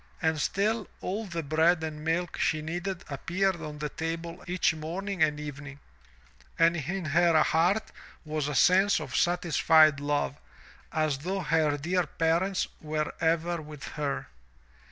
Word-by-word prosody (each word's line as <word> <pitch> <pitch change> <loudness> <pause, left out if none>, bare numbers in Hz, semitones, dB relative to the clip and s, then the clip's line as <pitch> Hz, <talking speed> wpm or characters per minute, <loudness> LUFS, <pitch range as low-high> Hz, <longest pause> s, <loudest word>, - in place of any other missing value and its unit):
And 160 -3 0
still 210 +5 0
all 205 +4 -3
the 170 -3 -4
bread 160 +3 +2
and 155 -1 -5
milk 165 +2 -1
she 155 -1 +1
needed 175 +3 -4
appeared 175 +6 -1
on 150 -2 -6
the 150 0 -3
table 165 +2 -5
each 180 -1 +2
morning 175 +5 -4
and 150 -1 +3
evening, 145 -1 -8 0.8
and 165 +1 +4
in 175 +4 -3
her 165 +1 +4
heart 180 +7 +1 0.3
was 155 -1 -2
a 150 - -3
sense 190 +9 +5
of 130 - -6
satisfied 160 -3 +4
love 145 -1 -1 0.5
as 155 -4 0
though 190 +6 -2
her 155 -3 +1
dear 175 +3 0
parents 170 +5 0
were 155 0 -2
ever 165 +1 +1
with 150 -2 -9
her. 145 -2 -3
160 Hz, 145 wpm, -28 LUFS, 150-175 Hz, 0.8 s, sense